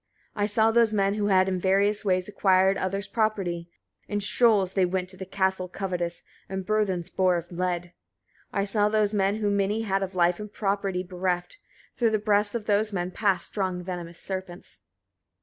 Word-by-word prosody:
63. 205 Hz, -, -2 dB
I -, -, +4 dB
saw 220 Hz, +1 st, +3 dB
those 230 Hz, -1 st, +3 dB
men 200 Hz, -1 st, +2 dB
who 205 Hz, -1 st, -1 dB
had 190 Hz, -1 st, +4 dB
in 185 Hz, -1 st, -1 dB
various 200 Hz, +3 st, +2 dB
ways 185 Hz, -2 st, +1 dB
acquired 190 Hz, -2 st, +3 dB
other's 195 Hz, +1 st, -2 dB
property: 195 Hz, -6 st, -1 dB, 0.4 s
in 205 Hz, -, -1 dB
shoals 205 Hz, -2 st, +3 dB
they 190 Hz, -, +2 dB
went 180 Hz, 0 st, -1 dB
to 190 Hz, 0 st, -7 dB
Castle 190 Hz, -1 st, 0 dB
covetous, 180 Hz, -2 st, -4 dB, 0.3 s
and 190 Hz, -1 st, -4 dB
burthens 190 Hz, -4 st, 0 dB
bore 185 Hz, -1 st, +2 dB
of 170 Hz, +1 st, -7 dB
lead. 175 Hz, 0 st, -2 dB, 0.6 s
64. -, -, -3 dB
I -, -, 0 dB
saw 205 Hz, +1 st, +2 dB
those 215 Hz, -1 st, +1 dB
men 200 Hz, 0 st, +2 dB
who 210 Hz, -1 st, 0 dB
many 200 Hz, +2 st, +1 dB
had 195 Hz, -2 st, 0 dB
of 190 Hz, -1 st, -4 dB
life 175 Hz, +1 st, +2 dB
and 210 Hz, -1 st, -7 dB
property 195 Hz, -3 st, -1 dB
bereft: 180 Hz, -, -3 dB, 0.4 s
through 235 Hz, -2 st, +2 dB
the 220 Hz, -, +1 dB
breasts 205 Hz, 0 st, +1 dB
of 225 Hz, -3 st, -3 dB
those 210 Hz, +1 st, +2 dB
men 180 Hz, -2 st, -2 dB
passed 200 Hz, -1 st, +1 dB
strong 185 Hz, -3 st, -2 dB
venomous 175 Hz, -2 st, -6 dB
serpents. 185 Hz, -2 st, -6 dB
195 Hz, 185 wpm, -26 LUFS, 185-210 Hz, 0.6 s, I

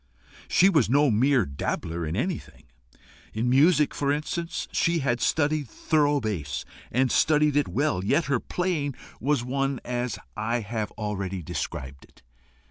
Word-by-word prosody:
She 185 Hz, -, +5 dB
was 155 Hz, -, +3 dB
no 140 Hz, +1 st, +4 dB
mere 130 Hz, +4 st, +3 dB
dabbler 80 Hz, +4 st, -3 dB
in 80 Hz, -, -3 dB
anything: 175 Hz, -, -4 dB, 0.7 s
in 115 Hz, +3 st, 0 dB
music, 150 Hz, +4 st, +4 dB
for 140 Hz, -1 st, 0 dB
instance, 165 Hz, +3 st, -3 dB
she 170 Hz, 0 st, +2 dB
had 125 Hz, -5 st, 0 dB
studied 150 Hz, -3 st, +1 dB
thorough 145 Hz, +1 st, +1 dB
bass, 100 Hz, -, -3 dB, 0.3 s
and 130 Hz, 0 st, +2 dB
studied 150 Hz, -1 st, +3 dB
it 145 Hz, -, +2 dB
well; 145 Hz, -10 st, 0 dB
yet 160 Hz, -, +2 dB
her 140 Hz, -3 st, +1 dB
playing 160 Hz, -6 st, -2 dB, 0.2 s
was 145 Hz, 0 st, +1 dB
such 135 Hz, +1 st, -1 dB
as 120 Hz, -1 st, -2 dB, 0.2 s
I 115 Hz, +3 st, -1 dB
have 110 Hz, 0 st, -3 dB
already 100 Hz, -4 st, -4 dB
described 70 Hz, -4 st, -5 dB
it. -, -, -25 dB
130 Hz, 145 wpm, -26 LUFS, 110-150 Hz, 0.7 s, She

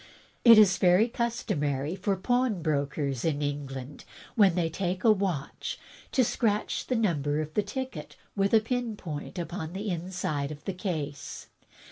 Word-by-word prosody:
"It 230 Hz, -2 st, +9 dB
is 200 Hz, -4 st, +6 dB
very 185 Hz, +5 st, +5 dB
customary 165 Hz, -, -1 dB
for 195 Hz, 0 st, 0 dB
pawnbrokers 155 Hz, -, 0 dB
in 150 Hz, -2 st, 0 dB
England, 140 Hz, -1 st, -5 dB, 0.3 s
when 195 Hz, -6 st, +5 dB
they 175 Hz, -2 st, +1 dB
take 185 Hz, +2 st, -3 dB
a 225 Hz, -, +7 dB
watch, 190 Hz, -9 st, -2 dB, 0.3 s
to 260 Hz, -, +3 dB
scratch 215 Hz, -3 st, 0 dB
the 255 Hz, -, 0 dB
number 150 Hz, -, +1 dB
of 155 Hz, 0 st, -4 dB
the 210 Hz, -, +2 dB
ticket 210 Hz, -, -6 dB, 0.2 s
with 195 Hz, -1 st, +1 dB
a 220 Hz, -, +6 dB
pin 235 Hz, -1 st, -2 dB
point 150 Hz, -1 st, -6 dB
upon 170 Hz, -1 st, -4 dB
the 200 Hz, +1 st, -3 dB
inside 165 Hz, -5 st, -2 dB
of 150 Hz, -1 st, -10 dB
the 195 Hz, -, -2 dB
case. 155 Hz, -7 st, -5 dB
180 Hz, 150 wpm, -28 LUFS, 150-210 Hz, 0.3 s, It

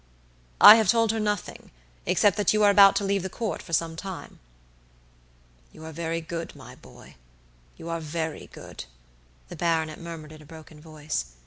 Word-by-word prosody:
"I 215 Hz, -, +10 dB
have 220 Hz, -3 st, +1 dB
told 230 Hz, -2 st, +3 dB
her 225 Hz, -, -3 dB
nothing, 210 Hz, -2 st, -4 dB, 0.4 s
except 205 Hz, -3 st, +3 dB
that 205 Hz, -1 st, +2 dB
you 215 Hz, 0 st, +2 dB
are 205 Hz, -, +6 dB
about 200 Hz, -1 st, +6 dB
to -, -, 0 dB
leave 200 Hz, 0 st, 0 dB
the 190 Hz, -, -5 dB
Court 215 Hz, -4 st, -4 dB
for 170 Hz, -, -14 dB
some 165 Hz, 0 st, -1 dB
time." 190 Hz, +1 st, -9 dB, 1.3 s
"You 160 Hz, -, -13 dB
are 160 Hz, -, -8 dB
very 165 Hz, +1 st, -4 dB
good, 165 Hz, 0 st, -7 dB
my -, -, -13 dB
boy, -, -, -17 dB, 0.6 s
you 165 Hz, -, -10 dB
are 165 Hz, 0 st, -3 dB
very 160 Hz, 0 st, -5 dB
good," -, -, -11 dB, 0.6 s
the -, -, -9 dB
baronet 160 Hz, -2 st, -1 dB
murmured 165 Hz, -3 st, -9 dB
in 155 Hz, -1 st, -13 dB
a -, -, -16 dB
broken 155 Hz, -1 st, -14 dB
voice. 155 Hz, -, -5 dB
165 Hz, 180 wpm, -25 LUFS, 160-200 Hz, 1.3 s, I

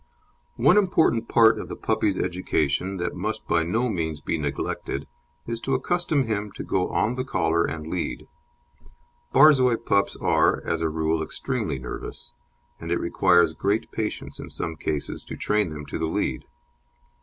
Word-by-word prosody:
One 145 Hz, -, +5 dB
important 160 Hz, -, +3 dB
part 115 Hz, -1 st, +5 dB
of -, -, -6 dB
the -, -, -6 dB
puppy's 100 Hz, -3 st, 0 dB
education 90 Hz, 0 st, -1 dB
that 85 Hz, -1 st, -2 dB
must 110 Hz, +4 st, -4 dB
by 85 Hz, -, +3 dB
no 110 Hz, +10 st, 0 dB
means 80 Hz, -8 st, -2 dB
be 75 Hz, -, -2 dB
neglected 75 Hz, -2 st, -3 dB, 0.4 s
is 115 Hz, 0 st, -4 dB
to 135 Hz, -, 0 dB
accustom 155 Hz, +1 st, +1 dB
him 105 Hz, -3 st, -2 dB
to -, -, -6 dB
go 95 Hz, -1 st, 0 dB
on 110 Hz, -, +1 dB
the 130 Hz, 0 st, -2 dB
collar 85 Hz, -10 st, +1 dB
and 80 Hz, -1 st, -4 dB
lead. 85 Hz, +2 st, -3 dB, 1.1 s
Borzoi 130 Hz, -4 st, +6 dB
pups 100 Hz, 0 st, +2 dB
are, -, -, +2 dB
as -, -, -1 dB
a 80 Hz, -, +1 dB
rule 80 Hz, +1 st, 0 dB
extremely 80 Hz, -, -3 dB
nervous, 60 Hz, -1 st, -7 dB, 0.5 s
and -, -, -6 dB
it -, -, +2 dB
requires 85 Hz, -3 st, +3 dB
great 100 Hz, +7 st, -1 dB
patience 110 Hz, -1 st, -4 dB
in -, -, -7 dB
some 80 Hz, -1 st, -4 dB
cases 75 Hz, -1 st, -3 dB
to -, -, -7 dB
train 105 Hz, -3 st, +1 dB
them 75 Hz, -1 st, -7 dB
to -, -, -5 dB
the 80 Hz, -, 0 dB
lead. -, -, -2 dB
95 Hz, 165 wpm, -25 LUFS, 80-115 Hz, 1.1 s, Borzoi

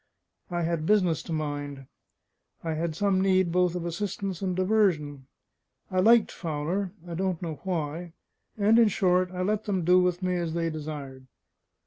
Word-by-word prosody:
I 175 Hz, -1 st, -1 dB
had 165 Hz, -1 st, -1 dB
business 185 Hz, -7 st, +3 dB
to -, -, -9 dB
mind, 145 Hz, -3 st, -4 dB, 0.8 s
I 165 Hz, -1 st, -1 dB
had 160 Hz, 0 st, -2 dB
some 195 Hz, +1 st, +2 dB
need 190 Hz, -2 st, +3 dB
both 180 Hz, 0 st, +2 dB
of 175 Hz, -1 st, -3 dB
assistance 195 Hz, +1 st, -3 dB
and 185 Hz, -2 st, -1 dB
diversion; 175 Hz, -9 st, +1 dB, 0.6 s
I 185 Hz, -, +1 dB
liked 225 Hz, +3 st, +5 dB
Fowler 170 Hz, +4 st, -3 dB, 0.2 s
I 170 Hz, -, -6 dB
don't 185 Hz, 0 st, -1 dB
know 160 Hz, -5 st, -5 dB
why; 170 Hz, -1 st, -3 dB, 0.4 s
and 215 Hz, +3 st, +4 dB
in 230 Hz, -, +6 dB
short, 185 Hz, -3 st, +2 dB
I 185 Hz, 0 st, -3 dB
let 210 Hz, +2 st, 0 dB
them 190 Hz, -5 st, -1 dB
do 180 Hz, +1 st, +6 dB
with 180 Hz, 0 st, 0 dB
me 180 Hz, -1 st, 0 dB
as 170 Hz, -2 st, -2 dB
they 165 Hz, -1 st, 0 dB
desired. 145 Hz, -4 st, -7 dB
180 Hz, 165 wpm, -27 LUFS, 160-190 Hz, 0.8 s, in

